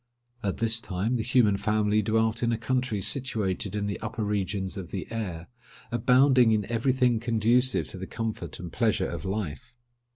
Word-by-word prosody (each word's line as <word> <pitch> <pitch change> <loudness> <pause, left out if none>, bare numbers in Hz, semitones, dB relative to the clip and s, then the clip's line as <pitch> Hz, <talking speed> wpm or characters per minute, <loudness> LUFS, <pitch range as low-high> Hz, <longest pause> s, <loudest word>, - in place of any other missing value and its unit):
At 100 -4 -2
this 115 0 +1
time 105 +3 -2
the - - -1
human 110 -3 +3
family 105 0 +1
dwelt 110 +2 +1
in 120 -1 +1
a 115 - 0
country 120 -2 -1
situated 110 -6 -1
in 105 -1 -1
the 100 - -3
upper 110 - -4
regions 100 -2 -2
of 95 -4 -6
the 95 - -4
air, 90 -7 -4 0.4
abounding 125 +1 +5
in 105 -2 +1
every 120 +3 +2
thing 125 -3 +2
conducive 120 +2 +2
to 95 - -8
the 95 - -6
comfort 115 -1 -5
and - - -8
pleasure - - +1
of - - -6
life. 95 - -4
110 Hz, 175 wpm, -27 LUFS, 100-120 Hz, 0.4 s, abounding